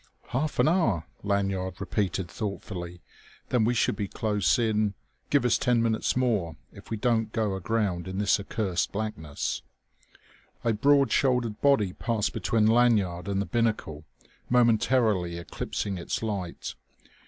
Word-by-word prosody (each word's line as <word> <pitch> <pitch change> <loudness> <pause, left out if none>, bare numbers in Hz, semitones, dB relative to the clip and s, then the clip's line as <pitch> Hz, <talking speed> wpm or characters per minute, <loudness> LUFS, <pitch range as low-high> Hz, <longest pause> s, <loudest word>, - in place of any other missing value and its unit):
"Half 150 +5 -1
an - - +4
hour?" 115 - +2 0.2
Lanyard 100 -2 -1
repeated 95 -2 -1
thoughtfully. 90 -4 -6 0.5
"Then 120 -4 +2
we 120 +2 +1
should 110 - +2
be 100 0 -3
close 105 -5 +1
in...." 110 -3 +1 0.3
"Give 140 -3 +3
us 125 - +3
ten 125 -3 +2
minutes 115 +1 0
more... 105 -11 0 0.2
if - - -14
we 110 - -2
don't 115 -1 +1
go 110 -4 0
aground 95 -2 -1
in 95 0 -5
this 105 0 +3
accursed 100 -3 -1
blackness!" 100 -8 -3 1.0
A 115 - +2
broad 140 +5 +4
shouldered 125 -5 +1
body 110 -10 +3
passed 110 0 -1
between 110 -2 +1
Lanyard 110 -7 +3
and 100 -1 0
the 100 - 0
binnacle, 110 -11 -1 0.5
momentarily 115 -6 +3
eclipsing 90 +3 -4
its 85 - -3
light. 100 -6 -4
105 Hz, 140 wpm, -27 LUFS, 95-115 Hz, 1.0 s, an